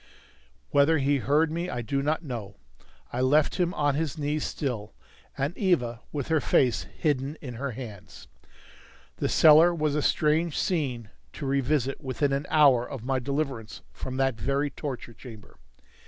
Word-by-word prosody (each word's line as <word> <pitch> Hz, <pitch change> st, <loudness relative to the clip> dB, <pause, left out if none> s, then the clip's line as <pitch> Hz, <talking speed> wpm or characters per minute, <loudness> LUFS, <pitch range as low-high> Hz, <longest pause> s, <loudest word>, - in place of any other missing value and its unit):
Whether 145 Hz, +3 st, +4 dB
he 140 Hz, 0 st, +2 dB
heard 150 Hz, +4 st, +2 dB
me 170 Hz, +2 st, -3 dB
I 120 Hz, -, -3 dB
do 140 Hz, +4 st, -1 dB
not 155 Hz, +4 st, -1 dB
know. 115 Hz, -8 st, -6 dB, 0.6 s
I 125 Hz, -, -1 dB
left 145 Hz, +4 st, +3 dB
him 175 Hz, -1 st, +2 dB
on 145 Hz, -1 st, +1 dB
his 155 Hz, +1 st, -2 dB
knees 150 Hz, 0 st, -1 dB
still, 115 Hz, -, -4 dB, 0.4 s
and 140 Hz, +6 st, -1 dB
Eva 125 Hz, -, 0 dB
with 145 Hz, 0 st, -4 dB
her 160 Hz, -2 st, +2 dB
face 125 Hz, -4 st, +2 dB
hidden 145 Hz, -1 st, -1 dB
in 125 Hz, -4 st, -7 dB
her 130 Hz, +2 st, -4 dB
hands. 100 Hz, -, -10 dB, 0.9 s
The -, -, -1 dB
cellar 160 Hz, +3 st, +6 dB
was 155 Hz, -2 st, 0 dB
a 150 Hz, -, 0 dB
strange 155 Hz, +2 st, +1 dB
scene 130 Hz, -, -1 dB, 0.2 s
to -, -, -6 dB
revisit 135 Hz, 0 st, 0 dB
within 135 Hz, +1 st, -1 dB
an 140 Hz, +1 st, -2 dB
hour 140 Hz, -6 st, +5 dB
of 125 Hz, -2 st, -7 dB
my 135 Hz, 0 st, 0 dB
deliverance 135 Hz, -4 st, -4 dB
from 130 Hz, -, -6 dB
that 135 Hz, -1 st, +2 dB
very 140 Hz, +5 st, 0 dB
torture 130 Hz, -4 st, -6 dB
chamber. 110 Hz, -, -13 dB
140 Hz, 160 wpm, -27 LUFS, 125-150 Hz, 0.9 s, cellar